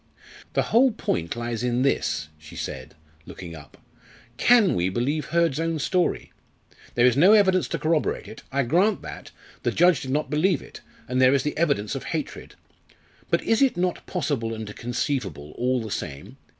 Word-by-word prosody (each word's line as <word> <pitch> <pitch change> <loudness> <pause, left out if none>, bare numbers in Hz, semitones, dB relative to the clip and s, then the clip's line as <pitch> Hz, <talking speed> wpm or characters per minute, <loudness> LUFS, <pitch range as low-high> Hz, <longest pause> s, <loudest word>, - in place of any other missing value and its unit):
"The - - +2
whole 255 +4 +6
point 85 - -2
lies 120 -1 -3
in 125 +1 0
this," 75 - 0
she 80 0 -13
said, 65 -1 -6 0.3
looking 85 -2 -9
up: 75 -3 -14 0.6
"Can 235 - +5
we 90 +1 +1
believe 135 +8 -1
Hurd's 165 -2 +1
own 165 0 -1
story? 180 +4 0 0.6
There 120 - +4
is 125 -2 +4
no 180 +9 +6
evidence 190 -4 +4
to - - -2
corroborate 160 -1 0
it. 110 - -10
I 140 +1 +1
grant 180 - +2
that - - -8 0.3
the - - 0
judge 175 -5 +4
did 135 - -6
not 150 +3 -1
believe 155 +1 +2
it - - -12 0.3
and 125 +1 0
there 130 +1 +6
is 135 - +1
the 150 - -2
evidence 140 -11 0
of - - -5
hatred. - - -5 0.7
But - - +1
is 225 +2 +2
it 270 -9 +3
not 180 0 -1
possible 135 -10 -2
and 110 -1 -7
conceivable 120 - -3
all 125 -1 -1
the 110 - -7
same? 70 -5 -6
135 Hz, 175 wpm, -25 LUFS, 115-170 Hz, 0.7 s, whole